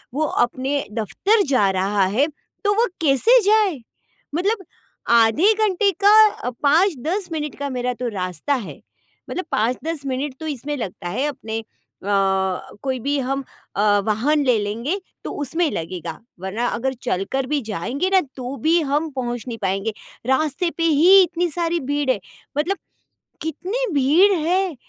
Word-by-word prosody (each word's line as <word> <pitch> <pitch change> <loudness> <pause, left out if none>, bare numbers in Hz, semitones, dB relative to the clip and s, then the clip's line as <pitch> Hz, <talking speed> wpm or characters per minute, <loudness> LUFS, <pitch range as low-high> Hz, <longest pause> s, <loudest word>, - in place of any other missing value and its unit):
वो 310 - +1 0.2
अपने 270 +3 -2
दफ़्तर 390 - +1
जा 210 -8 +3
रहा 195 +1 +1
है, 240 +11 +2 0.4
तो 410 0 +3
वो 460 +3 +4 0.2
कैसे 325 - +5
जाए? 415 -7 +3 0.6
मतलब 385 +2 0 0.5
आधे 235 - +5
घंटे 400 +1 +2
का 420 - +6
5-10 330 +4 +2
मिनट 300 -2 -3
का 285 0 -2
मेरा 250 -1 -2
तो 245 - 0
रास्ता 185 - -2
है, 235 -6 -6 0.5
मतलब 370 - -3
5-10 275 +7 -1
मिनट 265 +1 -2
तो 315 - -5
इसमें 290 0 -3
लगता 180 -5 -5
है 260 +10 -1
अपने 225 -5 -5 0.4
अ, - - -10 0.8
कोई 260 -2 -1
भी 280 +4 -1
हम 270 +1 -2 0.3
अ, 200 - +1 0.2
वाहन 275 +8 +2
ले 245 -3 +4
लेंगे 230 - -2 0.3
तो - - -3
उसमें 325 +3 0
लगेगा। 165 0 -5 0.2
वरना 210 +6 -2
अगर 265 +3 -1
चलकर 255 +4 -1
भी 295 0 0
जाएँगे 240 - -2
ना, 380 -1 +4
तो 255 +1 -5
भी 325 +8 +3
हम 295 +2 0
पहुँच 240 -2 -3
नहीं 230 -2 -4
पाएँगे, 195 +3 -1 0.3
रास्ते 310 +6 +1
पे 330 - 0
ही 335 +5 +7
इतनी 350 0 -1
सारी 340 +1 0
भीड़ 285 0 -1
है 215 - -1 0.4
मतलब 380 +6 0 0.6
कितनी 385 - -2
भीड़ 300 +9 +5
है। 360 +2 0
280 Hz, 150 wpm, -21 LUFS, 235-345 Hz, 0.8 s, ही